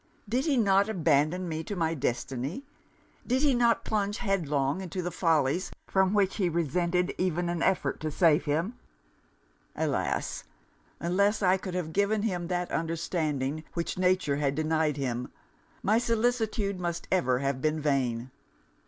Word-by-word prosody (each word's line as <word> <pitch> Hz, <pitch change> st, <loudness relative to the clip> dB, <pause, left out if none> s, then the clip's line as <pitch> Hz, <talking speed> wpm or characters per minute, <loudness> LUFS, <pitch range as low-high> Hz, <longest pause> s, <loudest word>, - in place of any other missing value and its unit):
Did 250 Hz, +6 st, 0 dB
he 285 Hz, -4 st, +2 dB
not 200 Hz, -2 st, +3 dB
abandon 170 Hz, -1 st, +2 dB
me 160 Hz, -1 st, -3 dB
to 205 Hz, -, -5 dB
my 165 Hz, -2 st, 0 dB
destiny? 135 Hz, -, -3 dB, 0.6 s
did 260 Hz, +3 st, +1 dB
he 285 Hz, -3 st, +4 dB
not 235 Hz, -1 st, +2 dB
plunge 205 Hz, -1 st, 0 dB
headlong 155 Hz, -, 0 dB
into 180 Hz, -1 st, -4 dB
follies 165 Hz, 0 st, +1 dB, 0.2 s
from 190 Hz, +1 st, +2 dB
which 195 Hz, -2 st, +2 dB
he 185 Hz, -4 st, +1 dB
resented 170 Hz, +2 st, 0 dB
even 175 Hz, -1 st, 0 dB
an 175 Hz, -1 st, -2 dB
effort 190 Hz, -, +1 dB
to 155 Hz, -, -2 dB
save 160 Hz, +1 st, +3 dB
him? 165 Hz, +11 st, -1 dB, 1.0 s
Alas! -, -, -1 dB, 0.6 s
unless 200 Hz, +5 st, +1 dB
I 185 Hz, 0 st, +4 dB
could 185 Hz, -1 st, -6 dB
have 165 Hz, -3 st, -3 dB
given 205 Hz, +1 st, +1 dB
him 180 Hz, -6 st, -1 dB
that 180 Hz, 0 st, -2 dB
understanding 155 Hz, -3 st, -1 dB
which 170 Hz, -1 st, -2 dB
nature 180 Hz, -6 st, +2 dB
had 140 Hz, -1 st, 0 dB
denied 155 Hz, -1 st, +1 dB
him, 125 Hz, -3 st, -3 dB, 0.5 s
my 215 Hz, +3 st, +3 dB
solicitude 225 Hz, -4 st, 0 dB
must 170 Hz, -1 st, -3 dB
ever 130 Hz, -9 st, +2 dB
have 135 Hz, 0 st, -1 dB
been 155 Hz, +1 st, +1 dB
vain! 130 Hz, -4 st, 0 dB
175 Hz, 145 wpm, -28 LUFS, 150-195 Hz, 1.0 s, he